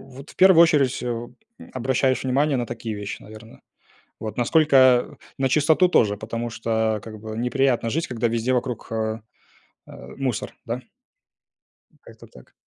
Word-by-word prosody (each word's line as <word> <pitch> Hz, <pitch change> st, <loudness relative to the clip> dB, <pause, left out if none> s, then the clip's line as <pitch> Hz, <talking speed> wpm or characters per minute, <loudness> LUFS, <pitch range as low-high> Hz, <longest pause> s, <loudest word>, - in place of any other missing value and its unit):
Вот 140 Hz, +2 st, -11 dB
в -, -, -22 dB
первую 185 Hz, -3 st, +7 dB
очередь, 140 Hz, -7 st, +2 dB
э, -, -, -3 dB
м, 120 Hz, 0 st, -5 dB, 0.4 s
обращаешь 130 Hz, 0 st, 0 dB
внимание 135 Hz, +2 st, +1 dB
на 120 Hz, -, -2 dB
такие 115 Hz, -2 st, -6 dB
вещи, 105 Hz, 0 st, -6 dB
наверно. 110 Hz, +2 st, -14 dB, 0.6 s
Вот 110 Hz, -1 st, -6 dB
насколько 130 Hz, -1 st, +4 dB, 0.2 s
на 135 Hz, -1 st, +1 dB
чистоту 155 Hz, +6 st, +3 dB
тоже, 105 Hz, -11 st, +2 dB
потому 115 Hz, +2 st, -5 dB
что 110 Hz, -1 st, -1 dB
как 110 Hz, -2 st, -10 dB
бы 110 Hz, 0 st, -7 dB
неприятно 125 Hz, -1 st, +1 dB
жить, 165 Hz, +5 st, -2 dB
когда 120 Hz, -2 st, -1 dB
везде 115 Hz, +2 st, -1 dB
вокруг, 125 Hz, -2 st, -3 dB
а, 110 Hz, 0 st, -2 dB, 0.6 s
а, 60 Hz, -, -12 dB
мусор, 130 Hz, -6 st, -3 dB
да. 120 Hz, +2 st, -4 dB, 1.2 s
Как-то -, -, -15 dB
так. -, -, -18 dB
120 Hz, 150 wpm, -23 LUFS, 110-135 Hz, 1.2 s, первую